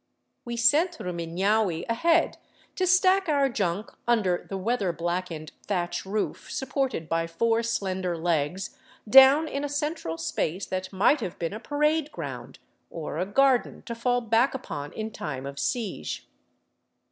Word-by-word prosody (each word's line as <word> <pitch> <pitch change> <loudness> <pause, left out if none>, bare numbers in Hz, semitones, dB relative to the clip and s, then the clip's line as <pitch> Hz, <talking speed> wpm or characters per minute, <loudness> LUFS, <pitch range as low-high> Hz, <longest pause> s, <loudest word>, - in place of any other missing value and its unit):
We 240 -1 -4
sent 305 +9 +3
Rumiiiaui 180 - 0
ahead 330 +9 +2 0.4
to 370 - 0
stack 370 0 +4
our 280 -2 +3
junk 200 -3 -2 0.2
under 205 -7 +1
the 195 - -3
weather 200 -1 0
blackened 170 -1 -3 0.2
thatch 175 -1 -2
roof 210 +2 -3
supported 265 - -2
by 165 0 0
four 225 +7 +1
slender 190 -6 -2
legs, 165 +2 -1 0.3
down 270 +6 +8
in 280 -1 -3
a 290 - -2
central 290 - -2
space 165 +2 -2
that 185 0 -4
might 205 +10 +3
have 185 -5 -4
been 165 +2 -3
a 215 - -5
parade 300 +3 0
ground - - -7 0.3
or 160 -1 -5
a 185 - -1
garden 265 +4 +2
to 235 - -5
fall 245 +1 0
back 230 +4 +2
upon 145 - -6
in 220 0 -4
time 135 -8 -5
of 140 0 -6
siege. 205 - -3
215 Hz, 145 wpm, -26 LUFS, 175-265 Hz, 0.4 s, down